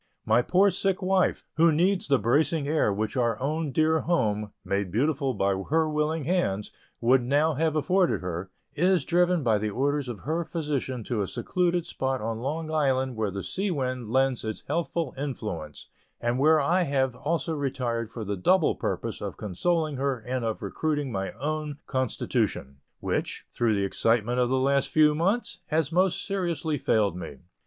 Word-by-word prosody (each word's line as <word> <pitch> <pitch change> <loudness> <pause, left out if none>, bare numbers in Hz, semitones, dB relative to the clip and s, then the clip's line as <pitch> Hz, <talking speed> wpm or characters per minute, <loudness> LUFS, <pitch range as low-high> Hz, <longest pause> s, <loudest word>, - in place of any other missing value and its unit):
My 110 +3 +4
poor 190 +9 +4
sick 190 +1 0
wife, 185 0 +2
who 165 +1 +6
needs 180 +5 +2
the 140 -1 +4
bracing 140 +7 +1
air 150 -8 +2
which 105 +4 -2
our 120 -4 +1
own 150 +3 -1
dear 160 +3 +3
home 105 - 0
(made 100 0 -1
beautiful 135 - 0
by 100 0 +1 0.2
her 160 +1 +3
willing 150 +1 0
hands) 130 - 0 0.3
would 125 +2 +4
now 145 +6 +2
have 155 +2 0
afforded 180 +4 +2
her, 90 +1 -4 0.2
is 180 -1 +2
driven 175 -1 +2
by 110 -4 +3
the 105 +1 -1
orders 140 +4 -1
of 110 -6 -6
her 160 +5 -1
physician 145 -7 -3
to 110 -1 -2
a 100 - -1
secluded 175 - 0
spot 130 0 -2
on 110 +1 -3
Long 155 +5 -3
Island 130 -4 +1
where 110 -2 -1
the 100 0 -5
sea 195 +2 -2
wind 130 - -2
lends 130 +1 +1
its 110 -1 -5
healthful 165 -3 -1
influence, 105 - -5 0.3
and 120 +2 0
where 155 +3 +5
I 170 +6 +2
have 135 -5 0
also 160 +3 -1
retired 125 -6 -2
for 115 -1 -6
the 100 0 -2
double 165 - +3
purpose - - -3
of - - -5
consoling 155 - -1
her 135 -1 0
and 125 +2 -4
of 110 -1 -3
recruiting 145 -4 -1
my 95 -2 -2
own 150 0 -3
constitution, 115 - -1 0.2
which, - - -2
through 115 -3 +1
the 100 -1 +1
excitements 115 +4 +1
of 120 - +2
the 130 - +2
last 140 +1 +2
few 155 -1 +5
months, 195 +10 0
has 155 -1 0
most 185 +2 +1
seriously 170 -6 -1
failed 105 -7 +2
me. 90 - -7
140 Hz, 175 wpm, -27 LUFS, 115-160 Hz, 0.3 s, who